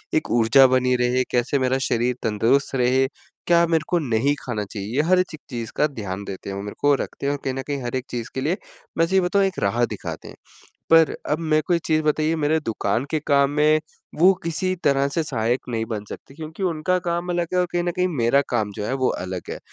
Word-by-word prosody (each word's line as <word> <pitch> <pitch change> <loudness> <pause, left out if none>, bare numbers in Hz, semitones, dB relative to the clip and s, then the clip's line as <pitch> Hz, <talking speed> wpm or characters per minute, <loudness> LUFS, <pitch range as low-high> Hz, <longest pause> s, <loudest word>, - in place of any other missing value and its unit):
एक 155 - 0
ऊर्जा 120 +3 +6
बनी 125 0 +2
रहे, 125 +1 +1
कैसे 125 +3 +1
मेरा 130 0 +1
शरीर 120 +2 0
तंदुरुस्त 115 +6 +1
रहे, 130 +1 +3 0.4
क्या 170 0 +5
मेरे 160 -2 +1
को 175 - +1
नहीं 130 0 +1
खाना 110 -5 -2
चाहिए, 100 +2 -6
ये 145 - +4
हर 185 0 +5
चक 155 - -7
चीज़ 115 -3 -5
का 150 - +3
ध्यान 100 -7 -6
देते 100 0 -7
हैं 95 - -4
वो 100 - -4
मेरे 105 - -7
को 145 0 +4
रखते - - -6
हैं 140 - +1
और 145 - -4
कहीं 135 - -1
न 135 - -3
कहीं 140 -2 -3
हर 120 +1 -3
एक 130 0 -2
चीज़ 120 -2 -4
के 130 - -2
लिए 165 +7 0 0.4
मैं 165 - +4
सही 190 +2 +3
बताऊँ 195 +2 +2
एक 190 - -2
राह 115 +5 +1
दिखाते - - -7
हैं। - - -11 0.6
पर 165 -1 +6 0.2
अब 150 - +1
मेरे 155 -2 +1
को 175 - +2
एक 170 - +1
चीज़ 155 -1 +2
बताइए 155 +1 +1
मेरे 155 +1 +1
दुकान 115 -1 -1
के 155 - +1
काम 140 -1 +3
में 150 +1 +3 0.4
वो 185 +3 +7
किसी 185 +3 0
तरह 140 0 +3
से 150 +4 -1
सहायक 120 -3 -1
नहीं 115 -2 -1
बन 105 -2 -4
सकते 135 - -10
क्योंकि 160 +4 -8
उनका 180 +1 0
काम 175 0 -3
अलग 175 -1 -1
है - - +2
और 180 - +1
कहीं 175 - +1
न 175 - 0
कहीं 180 0 +2
मेरा 140 -4 +2
काम 110 -4 0
जो 105 - -3
है - - -2
वो 130 - +4
अलग 90 -1 -4
है, - - -5
140 Hz, 245 wpm, -23 LUFS, 120-160 Hz, 0.6 s, वो